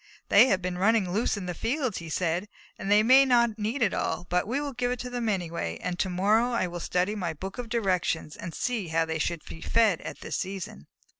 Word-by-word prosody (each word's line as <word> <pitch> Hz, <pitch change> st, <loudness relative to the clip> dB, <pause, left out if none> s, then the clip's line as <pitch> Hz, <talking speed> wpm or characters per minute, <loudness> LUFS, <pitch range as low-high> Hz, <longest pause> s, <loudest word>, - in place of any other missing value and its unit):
"They -, -, +7 dB
have 190 Hz, -6 st, +1 dB
been 180 Hz, 0 st, -3 dB
running 200 Hz, -2 st, +3 dB
loose 210 Hz, +2 st, 0 dB
in 195 Hz, -, -5 dB
the 180 Hz, -, -3 dB
fields," 255 Hz, -, -2 dB
he 165 Hz, -1 st, -8 dB
said, 175 Hz, +4 st, -1 dB, 0.3 s
"and 195 Hz, -, -4 dB
they 210 Hz, +1 st, +6 dB
may 260 Hz, +4 st, +7 dB
not 235 Hz, -4 st, +3 dB
need 225 Hz, +5 st, -1 dB
it 200 Hz, -, +2 dB
all, 175 Hz, -, -2 dB
but 180 Hz, +2 st, +1 dB
we 255 Hz, +5 st, 0 dB
will 290 Hz, -1 st, -4 dB
give 245 Hz, 0 st, -1 dB
it 250 Hz, -, -1 dB
to 250 Hz, -, -6 dB
them 240 Hz, -2 st, -1 dB
anyway, 175 Hz, -4 st, -2 dB
and 180 Hz, -1 st, -4 dB
to 190 Hz, -, +1 dB
morrow 215 Hz, +7 st, +2 dB
I 230 Hz, -, +1 dB
will 175 Hz, -1 st, -5 dB
study 180 Hz, +4 st, 0 dB
my 180 Hz, -6 st, -3 dB
book 190 Hz, +8 st, -7 dB
of 240 Hz, -2 st, -5 dB
directions 185 Hz, -8 st, 0 dB
and 170 Hz, -, -7 dB
see 230 Hz, -7 st, -2 dB
how 165 Hz, 0 st, +1 dB
they 160 Hz, 0 st, -3 dB
should 165 Hz, +1 st, -2 dB
be 160 Hz, -, -10 dB
fed 220 Hz, -7 st, +2 dB
at -, -, -8 dB
this -, -, -3 dB
season." 185 Hz, -, -6 dB
195 Hz, 240 wpm, -27 LUFS, 175-235 Hz, 0.3 s, They